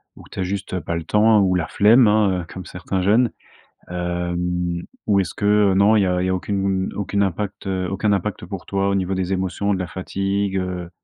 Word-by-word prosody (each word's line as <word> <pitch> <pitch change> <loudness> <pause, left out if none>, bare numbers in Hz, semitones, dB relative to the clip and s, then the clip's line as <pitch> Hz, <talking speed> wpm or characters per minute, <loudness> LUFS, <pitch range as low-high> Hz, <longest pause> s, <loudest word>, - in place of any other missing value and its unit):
ou - - -14
tu - - -7
as - - +1
juste, 95 +1 -4
heu, 90 - -2
pas 85 - -3
le 85 - -3
temps, 105 +5 +4
ou 95 -1 +2
la 85 -2 -1
flemme 115 +3 +5
hein, 100 -5 +2
comme 95 -1 -9
certains 95 +1 -3
jeunes. 110 +6 +3 0.6
Hem, 90 0 -2 0.2
ou 100 -2 +4
est-ce 90 -2 -2
que, - - -8 0.3
heu, - - +2
non 100 +3 +4
il - - +4
y - - +2
a 90 -1 0
il - - 0
y - - 0
a 95 - +1
aucune, 95 0 -1
aucune 100 0 -1
impact, 100 +2 -3
heu, 95 -1 -1
aucun 100 +2 +1
impact 100 -1 -2
pour 95 0 -7
toi 100 0 -1
au 100 - +1
niveau 95 0 -1
des 95 0 -1
émotions, 95 +2 -1
de 95 - -2
la 90 - -3
fatigue, 95 +1 -2
heu? 90 -2 -3
95 Hz, 235 wpm, -21 LUFS, 90-100 Hz, 0.6 s, flemme